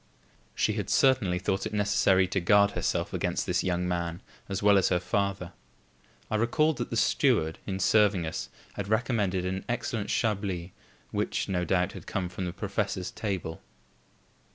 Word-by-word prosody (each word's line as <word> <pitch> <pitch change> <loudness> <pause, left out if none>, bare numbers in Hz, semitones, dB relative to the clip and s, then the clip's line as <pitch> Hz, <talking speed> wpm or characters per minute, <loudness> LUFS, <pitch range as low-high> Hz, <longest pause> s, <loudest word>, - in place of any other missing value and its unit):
She 105 - +1
had 105 -3 -3
certainly 115 -7 +3
thought 95 +1 -1
it - - -8
necessary 100 -2 +3
to 95 - 0
guard 100 +3 +4
herself - - -1
against - - -1
this - - 0
young 90 -1 0
man 85 -1 -3 0.3
as 95 0 -3
well 100 -1 +6
as 95 - +2
her 90 - +2
father. 95 0 -2 0.8
I 110 - +2
recalled 150 +7 +2
that - - -3
the - - -2
steward, 80 +1 +2
in 95 -2 -2
serving 105 -5 +3
us, 80 - -4 0.2
had 100 -1 -5
recommended 105 -5 0
an 95 +1 -2
excellent 115 -3 -2
Chablis 100 -6 -1 0.4
which, - - -1
no 90 -2 -1
doubt, 90 +2 +1
had - - -11
come 95 -3 -2
from 90 +1 -4
the 90 - -3
professor's 90 +1 -3
table. 95 -6 -4
95 Hz, 165 wpm, -28 LUFS, 90-105 Hz, 0.8 s, well